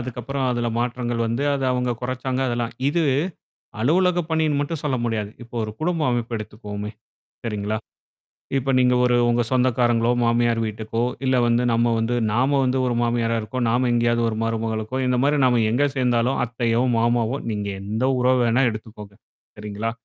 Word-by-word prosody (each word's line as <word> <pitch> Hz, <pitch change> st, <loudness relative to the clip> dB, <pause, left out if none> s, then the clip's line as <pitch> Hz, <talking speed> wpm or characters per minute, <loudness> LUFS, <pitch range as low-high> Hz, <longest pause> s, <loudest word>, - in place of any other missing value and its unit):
அதுக்கப்புறம் 130 Hz, +3 st, -4 dB
அதுல 120 Hz, -1 st, -1 dB
மாற்றங்கள் 120 Hz, -1 st, -2 dB
வந்து. 115 Hz, +5 st, -1 dB
அது 135 Hz, -1 st, -2 dB
அவங்க 125 Hz, 0 st, 0 dB
குறைச்சாங்க 130 Hz, +1 st, -2 dB
அதெல்லாம். 120 Hz, -1 st, -2 dB, 0.2 s
இது 165 Hz, +3 st, +1 dB, 0.8 s
அலுவலக 175 Hz, +7 st, +3 dB
பணின்னு 155 Hz, -3 st, +1 dB
மட்டும் 145 Hz, +1 st, -3 dB
சொல்ல 135 Hz, -3 st, 0 dB
முடியாது. 110 Hz, -3 st, -2 dB
இப்ப 120 Hz, +1 st, -14 dB
ஒரு 110 Hz, -, -5 dB
குடும்ப 165 Hz, -1 st, 0 dB
அமைப்பு 120 Hz, -1 st, -2 dB
எடுத்துக்குவோமே. 105 Hz, -1 st, -6 dB, 0.6 s
சரிங்களா? 105 Hz, 0 st, -2 dB, 0.8 s
இப்ப 135 Hz, 0 st, 0 dB
நீங்க 125 Hz, 0 st, +4 dB
ஒரு 125 Hz, 0 st, +3 dB
உங்க 120 Hz, 0 st, +2 dB
சொந்தக்காரங்களோ, 120 Hz, -2 st, +2 dB
மாமியார் 115 Hz, 0 st, +2 dB
வீட்டுக்கோ, 110 Hz, +1 st, -3 dB, 0.2 s
இல்ல 130 Hz, -1 st, +2 dB
வந்து 120 Hz, +1 st, +2 dB
நம்ம 115 Hz, 0 st, +2 dB
வந்து 115 Hz, +2 st, 0 dB, 0.2 s
நாம 135 Hz, +4 st, +2 dB
வந்து 130 Hz, +1 st, +1 dB
ஒரு 120 Hz, -, 0 dB
மாமியாரா 115 Hz, -1 st, +1 dB
இருக்கோம், 125 Hz, +3 st, -3 dB
நாம 125 Hz, +2 st, +2 dB
எங்கேயாவது 120 Hz, 0 st, +2 dB
ஒரு 110 Hz, -, -3 dB
மருமகளுக்கோ, 115 Hz, +1 st, -2 dB
இந்த 125 Hz, 0 st, +2 dB
மாரி 145 Hz, +1 st, +3 dB
நாம 125 Hz, -2 st, +3 dB
எங்க 125 Hz, +6 st, +2 dB
சேர்ந்தாலும், 125 Hz, 0 st, +1 dB
அத்தையோ, 115 Hz, -1 st, 0 dB, 0.2 s
மாமாவோ 120 Hz, +2 st, +1 dB
நீங்க 105 Hz, -1 st, -3 dB
எந்த 110 Hz, +5 st, -2 dB
உறவு 125 Hz, 0 st, +3 dB
வேணா 120 Hz, +3 st, +3 dB
எடுத்துக்கோங்க? 110 Hz, -2 st, -9 dB, 0.4 s
சரிங்களா? 105 Hz, +2 st, -4 dB
120 Hz, 160 wpm, -23 LUFS, 115-130 Hz, 0.8 s, நீங்க